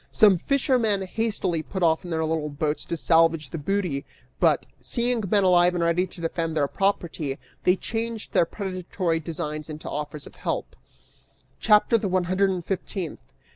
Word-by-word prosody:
Some 200 -5 +5
fishermen 245 - +1
hastily 190 -4 -1
put 190 +3 -4
off 160 -1 +3
in 175 - -8
their 160 -1 0
little 155 -1 -1
boats 150 +1 -2
to 170 - -3
salvage 165 -4 +3
their 165 - -5
booty, 175 -4 -1 0.4
but, - - +3
seeing 240 -2 0
men 200 0 +3
alive 180 -1 +5
and 170 - 0
ready 170 +2 +2
to 175 - -11
defend 165 -1 -2
their 145 -2 +2
property, 165 -7 -1 0.3
they 180 - +5
changed 225 +2 -4
their - - +4
predatory 185 -3 -2
designs 155 -1 -4
into 155 0 -7
offers 150 0 -5
of - - -12
help. - - -3 0.8
CHAPTER 215 +2 +4
THE 205 - -2
ONE 185 0 +2
HUNDRED 185 +3 +2
AND 180 -3 -3
FIFTEENTH. 185 -2 -4
175 Hz, 170 wpm, -25 LUFS, 160-200 Hz, 0.8 s, Some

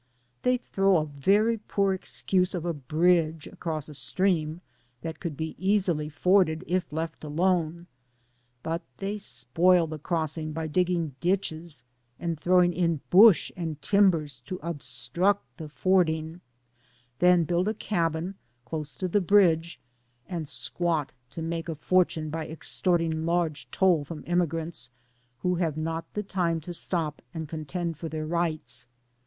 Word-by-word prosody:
They 250 0 +3
throw 195 -5 +2
a 155 - +1
very 200 +11 +2
poor 200 -2 +1
excuse 180 +4 0
of 175 -2 -3
a 170 - 0
bridge 160 +2 +1
across 160 -5 -4
a 150 - -9
stream 165 +1 +1 0.4
that 165 -1 -5
could 165 -6 -5
be 160 0 -3
easily 185 -6 +1
forded 175 +1 +3
if 180 -2 -1
let 160 +1 -4
alone, 170 +1 0 0.8
but 165 +1 -2 0.2
they 200 +2 -3
spoil 170 - +2
the 155 -1 -6
crossing 155 -1 -2
by 160 +1 -3
digging 170 -1 0
ditches 170 -5 -1 0.4
and 170 -3 -3
throwing 175 +1 +4
in 170 -4 0
bush 200 0 +7
and 160 -4 -4
timbers 160 -6 +2
to 185 - -4
obstruct 170 +5 -1
the 155 -2 -7
fording, 160 -1 +1 0.8
then 180 -1 +5
build 175 +4 0
a 215 - 0
cabin, 170 -3 -1 0.3
close 150 +2 -5
to 185 - -2
the 200 +3 +2
bridge, 170 -3 +3 0.5
and 165 -5 -4
squat 165 -5 -1 0.2
to 165 - -6
make 165 +1 -3
a 165 - -2
for 185 +4 +3
tune 155 -2 -5
by 160 0 -3
extorting 165 0 +1
large 170 -4 0
toll 180 -6 +3
from 150 +2 -8
emigrants, 165 -5 -1 0.5
who 180 -1 +1
have 165 -4 -1
not 165 +1 -3
the 210 - -1
time 175 -4 0
to 175 +3 -7
stop 165 -3 -1
and 160 -1 -4
contend 160 +1 -4
for, 165 - -4
their 155 0 -4
rights. 165 -4 -1
165 Hz, 145 wpm, -27 LUFS, 155-180 Hz, 0.8 s, bush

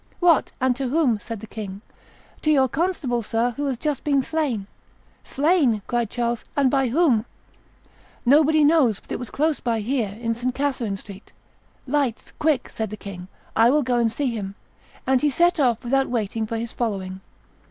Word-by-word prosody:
"What, 345 -4 +4
and 255 -1 +2
to 270 -1 -2
whom?" 260 -5 +2
said 225 -1 -7
the - - -7
king. 200 -2 -7 0.6
"To 310 - 0
your 270 -3 +5
constable, 280 -5 -1
sir, 230 +2 0
who 285 +4 -3
has 260 -3 -1
just 295 +1 -2
been 280 -3 +2
slain." 285 -11 -1 0.6
"Slain!" 280 - +2
cried 240 -3 -1
Charles; 235 -1 -2
"and 275 -3 +3
by 270 -2 +2
whom?" 250 -4 +2 1.0
"Nobody 305 +4 +5
knows; 290 - +4
but - - -18
it - - -2
was 245 - -6
close 305 +1 0
by 230 -2 -1
here, 235 -1 -1
in 230 -1 -1
St. 245 +2 -3
Catherine 255 -8 -1
Street." 195 +1 -12 0.5
"Lights! 275 -4 -1
quick!" 305 -5 +1
said 220 -2 -4
the 215 - -7
king; 185 -3 -8 0.3
"I 230 +1 +6
will 295 +3 +3
go 245 -1 +1
and 230 -1 +2
see 260 +2 -1
him;" 200 -2 -5 0.5
and 260 -1 +3
he 300 - +3
set 345 +4 +2
off, 245 -5 +2
without 270 +2 +1
waiting 225 -2 -2
for 230 - -3
his 230 0 -4
following. 190 -5 -3
245 Hz, 185 wpm, -23 LUFS, 225-285 Hz, 1.0 s, I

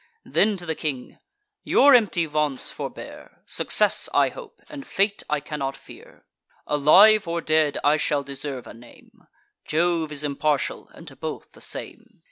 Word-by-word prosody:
Then 210 -1 +1
to 175 - -9
the 160 - -2
king: 140 -5 -5 0.4
"Your 285 0 +5
empty 210 -8 +3
vaunts 150 -3 -2
forbear; - - -9
Success - - +2
I - - +4
hope, 485 -4 -12
and 290 -4 -10
fate 200 +1 0
I 150 0 0
cannot 140 -2 -5
fear; - - -16 0.4
Alive 190 +8 +5
or 170 0 -2
dead, 155 -2 +1
I 150 +1 +3
shall 145 -2 0
deserve 140 -2 -6
a - - -11
name; 120 +1 -19 0.4
Jove 165 0 0
is 150 0 -3
impartial, 145 -1 -2
and 165 - -14
to 135 - -11
both 155 +3 -7
the - - -18
same." - - -8
155 Hz, 155 wpm, -23 LUFS, 145-175 Hz, 0.4 s, Your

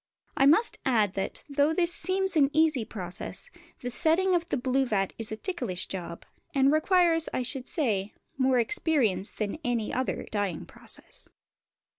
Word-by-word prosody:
I 270 - +4
must 330 +11 +4
add 220 -7 +2
that, 195 0 -4
though 290 +2 +1
this 345 0 +2
seems 380 0 0
an 280 -3 +4
easy 310 -5 +3
process, 185 -5 -7 0.3
the 245 - -4
setting 350 +7 +3
of 345 -1 0
the - - -1
blue 260 +1 0
vat 195 -4 -1
is 225 -1 -4
a 215 - -4
ticklish 245 - -2
job, 170 -3 -7 0.3
and 275 0 +4
requires, 330 +1 +3
I 255 - -1
should 255 +1 +2
say, 215 - -1 0.2
more 260 -1 +2
experience 240 - +2
than 215 +7 -4
any 235 -5 -1
other 255 +1 -2
dyeing 205 -6 -2
process. - - -6
265 Hz, 160 wpm, -27 LUFS, 215-320 Hz, 0.3 s, I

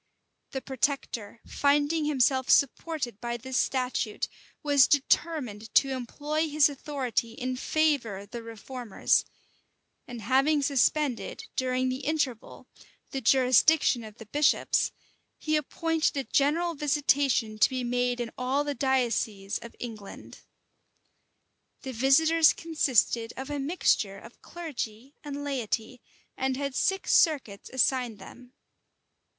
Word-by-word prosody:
The 265 - -5
protector, 260 -5 -3
finding 290 +2 +1
himself 265 -2 +2
supported 280 -4 +1
by 240 0 -3
this 260 +2 -7
statute, 250 -4 -1 0.4
was 285 -3 +5
determined 270 -7 0
to 275 - +5
employ 295 +5 -2
his 300 0 +4
authority 265 -5 -3
in 255 0 -3
favor 280 -7 0
of 200 +1 -11
the 235 - -6
reformers; 230 0 -1 0.8
and 240 -3 -8
having 275 +5 +2
suspended, 280 - 0
during 255 0 0
the 255 +1 -3
interval, 285 -5 -3 0.4
the 270 - -3
jurisdiction 260 +1 +4
of 215 -1 -11
the 225 - -11
bishops, 290 +7 +2 0.5
he 310 0 -1
appointed 320 +1 0
a 275 - 0
general 320 +6 +1
visitation 275 -6 +1
to - - +5
be 255 -1 -3
made 245 0 0
in 235 -2 -3
all 260 +3 0
the 290 0 -2
dioceses 235 -7 -1
of 235 - -11
England.[] 220 -5 -9 1.4
The 265 - -5
visitors 315 +6 +4
consisted 255 -8 +1
of 265 +2 -6
a 290 - -2
mixture 270 - +1
of 230 +4 -15
clergy 275 -7 -7
and 285 -1 -6
laity, 250 -3 -3 0.3
and 265 0 -1
had 280 -1 -3
six 385 +8 0
circuits 270 - +2
assigned 255 -3 +1
them. 245 +5 -14
265 Hz, 120 wpm, -28 LUFS, 240-290 Hz, 1.4 s, was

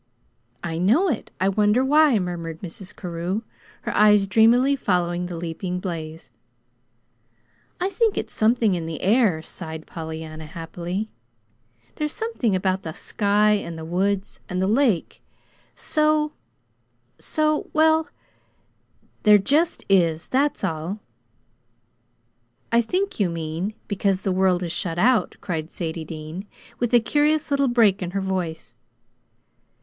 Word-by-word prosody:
"I 165 -1 -3
know 250 - +3
it. 255 - -3
I 190 - +2
wonder 210 +5 +3
why," 295 -2 +5
murmured 170 -3 -4
Mrs. 185 +2 -8
Carew, 180 +4 -3 0.4
her - - -3
eyes 210 -1 +5
dreamily 235 +7 +4
following 180 -6 0
the 175 -1 -6
leaping 175 +2 -4
blaze. 165 -3 -6 1.5
"I 370 +2 -1
think 450 -1 +1
it's - - -3
something 225 -1 +3
in 170 -2 -3
the 160 -1 -5
air," 200 -6 +3
sighed 160 -3 -7
Pollyanna, 160 -1 -7
happily. 170 +6 -5 0.9
"There's 300 0 -2
something 440 - -1
about 185 0 0
the 160 -3 -6
sky 210 +3 +2
and 200 -6 -1
the 160 - -7
woods 190 +3 -1
and 180 - -2
the 190 - +2
lake 220 - +1 0.5
so 305 -1 +2 0.9
so 305 -1 0
well, 315 +1 +3 1.1
there 210 -1 +7
just 295 - +1
is; 170 -4 +2
that's 280 +3 +1
all." 165 +5 -2 1.7
"I 235 0 +5
think 370 - -2
you 195 -4 +2
mean, 165 +5 -4
because 195 -2 0
the 195 - 0
world 185 -1 +2
is 170 - -3
shut 170 0 -3
out," 235 +4 +3
cried 160 -3 -3
Sadie 165 -2 -4
Dean, 160 +5 -7 0.3
with 240 -2 0
a 240 - +7
curious 300 +5 +1
little 280 -1 +3
break 225 -6 +3
in 180 - -2
her - - 0
voice. 175 -10 -3
190 Hz, 135 wpm, -23 LUFS, 170-240 Hz, 1.7 s, there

